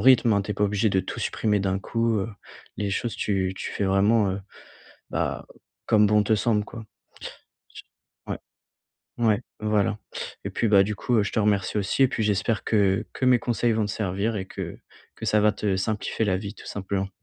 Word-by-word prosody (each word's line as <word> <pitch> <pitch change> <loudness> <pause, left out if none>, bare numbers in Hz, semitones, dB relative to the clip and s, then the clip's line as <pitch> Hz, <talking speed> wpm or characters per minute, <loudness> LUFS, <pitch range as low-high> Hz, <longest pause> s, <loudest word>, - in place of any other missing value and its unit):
rythme, 125 -1 +6
hein. 100 - +2
Tu 105 - -3
es - - -7
pas 105 - -1
obligé 105 +2 +1
de 95 -2 +2
tout 95 - -6
supprimer 105 -2 0
d'un 95 0 -1
coup 115 +1 0
heu, 95 - -3 0.5
les 100 -1 -2
choses, 115 +4 -2
tu 95 -3 0
tu - - -4
fais 100 - -1
vraiment, 100 +2 +3
heu, 95 +1 -3 0.7
bah, - - -2 0.4
comme 105 -1 +5
bon 105 0 +4
te 110 - +2
semble, 105 0 +1
quoi. 115 +1 -9 1.4
Ouais. - - -3 0.8
Ouais 110 -3 +3 0.2
voilà. 105 -1 +1 0.5
Et - - -3
puis, 115 - 0
bah, 100 -2 +6
du 105 +1 -2
coup, 120 - -2
heu, 105 - +4
je - - -4
te - - 0
remercie 100 -1 +1
aussi 100 +7 +2
et 130 - +4
puis 115 - -2
j'espère 105 +1 +1
que 100 -3 +2
que 130 - -3
mes 125 -1 +5
conseils 120 0 +1
vont 110 -1 +1
te - - -3
servir 105 +1 -1
et 95 -1 -4
que - - -6 0.4
que - - -6
ça 105 - +3
va 105 0 +5
te 105 -2 -1
simplifier 110 +3 -1
la 95 -2 +1
vie 100 +2 -6
tout - - -13
simplement. 95 -1 -3
105 Hz, 205 wpm, -25 LUFS, 100-110 Hz, 1.4 s, rythme